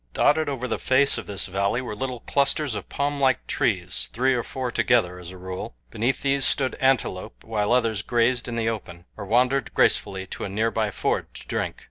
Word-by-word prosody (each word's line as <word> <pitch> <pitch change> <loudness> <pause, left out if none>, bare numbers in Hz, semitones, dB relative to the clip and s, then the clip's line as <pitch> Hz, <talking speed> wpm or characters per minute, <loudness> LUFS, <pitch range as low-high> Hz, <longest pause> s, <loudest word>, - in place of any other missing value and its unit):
Dotted 155 0 +3
over 130 -2 -3
the 115 - -2
face 135 +2 +3
of - - -9
the 100 - -6
valley 100 +4 0
were 125 -5 -5
little 125 +2 -4
clusters 140 -1 +1
of - - -6
palmlike 140 -2 +1
trees 90 -4 0
three 130 +3 +2
or 120 - +1
four 125 +1 -4
together 100 -10 +2
as 90 -1 -8
a 95 - -10
rule. 95 +5 -6 0.2
Beneath 120 +4 -1
these 140 -1 +2
stood 130 0 +2
antelope, 130 -8 0
while 105 -2 -1
others 115 -4 +2
grazed 120 +1 +1
in 120 - -4
the 115 -1 0
open, 90 -6 -5
or 100 - -7
wandered 125 +5 +2
gracefully 95 -1 +2
to - - -7
a - - -3
nearby 110 +1 0
ford - - -1
to - - -11
drink. - - -2
115 Hz, 195 wpm, -25 LUFS, 100-130 Hz, 0.2 s, Dotted